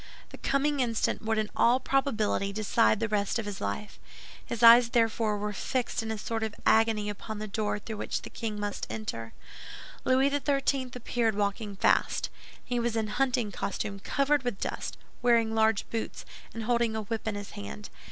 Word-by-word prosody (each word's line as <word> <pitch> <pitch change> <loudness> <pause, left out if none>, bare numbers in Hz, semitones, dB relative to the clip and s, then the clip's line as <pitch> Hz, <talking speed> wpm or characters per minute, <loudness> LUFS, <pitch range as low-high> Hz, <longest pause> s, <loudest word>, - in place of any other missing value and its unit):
The - - -11
coming 280 +1 +1
instant 230 -4 0
would 220 0 0
in 215 -1 -1
all 245 +2 +4
probability 220 -8 0
decide 215 +1 +2
the 225 - 0
rest 205 0 0
of 225 - -3
his 205 -2 -5
life. 100 - -4 0.4
His 235 0 -4
eyes 235 +1 +9
therefore 225 -2 +2
were 210 0 -3
fixed 245 +5 -1
in 225 - -5
a 220 - -2
sort 225 +2 -3
of 220 -2 -3
agony 220 -2 +4
upon 210 +1 -5
the 215 - -4
door 210 0 -1
through 215 +1 -7
which - - -3
the - - -8
king 215 -2 -4
must 205 0 -3
enter. 115 - -5 0.7
Louis 265 +2 +3
XIII. 275 -2 +1
appeared, 235 -2 0
walking 205 0 -1
fast. - - +2 0.3
He 245 -1 -1
was 235 -1 -1
in 220 -1 0
hunting 245 -2 0
costume 200 +2 -3
covered 280 +7 +1
with 245 -6 -3
dust, - - -4 0.2
wearing 230 -2 +3
large 220 -2 +2
boots, 225 -1 -4 0.3
and 225 - -5
holding 235 -1 +1
a 220 - -2
whip 220 +1 -4
in 215 - -1
his 205 -1 -6
hand. 100 -9 -8
220 Hz, 180 wpm, -29 LUFS, 210-240 Hz, 0.7 s, eyes